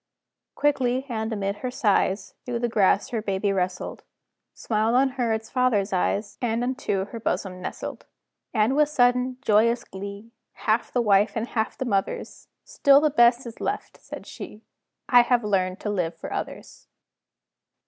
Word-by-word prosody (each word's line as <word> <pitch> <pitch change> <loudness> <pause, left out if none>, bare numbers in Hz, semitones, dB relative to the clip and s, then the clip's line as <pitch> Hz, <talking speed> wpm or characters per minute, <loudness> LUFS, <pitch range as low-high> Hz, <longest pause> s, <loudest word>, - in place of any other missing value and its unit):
Quickly, 265 -3 +1
and 220 -1 -2
amid 200 -1 -2
her 255 - -4
sighs, 215 -5 +1
Through 245 -1 -3
the 240 +1 0
grass 205 -3 +2
her 230 -3 -2
baby 200 -1 -1
wrestled, 180 -1 -3 0.5
Smiled 220 +1 0
on 265 +1 +4
her 250 -3 -1
its 220 0 -3
father's 230 -6 +1
eyes, 200 +3 -1
And 235 -1 0
unto 245 -7 -1
her 230 +3 -8
bosom 185 -4 -3
nestled. - - -6 0.4
And 220 +3 +2
with 300 0 +3
sudden, 250 -2 +2
joyous 230 0 +3
glee, 200 +3 -8 0.2
Half 220 +1 0
the 245 - +1
wife's 205 0 +3
and 225 +2 -2
half 220 -2 -2
the 260 - -3
mother's, 200 -5 -2 0.2
"Still 285 - +4
the 305 0 +2
best 240 -1 +4
is 235 -1 -9
left," - - -4
said - - -9
she: 215 - -10 0.4
"I 245 -2 +7
have 240 -1 +2
learned 185 -2 0
to 210 - -2
live 175 -4 -1
for - - -7
others." - - -7
225 Hz, 160 wpm, -25 LUFS, 200-250 Hz, 0.5 s, I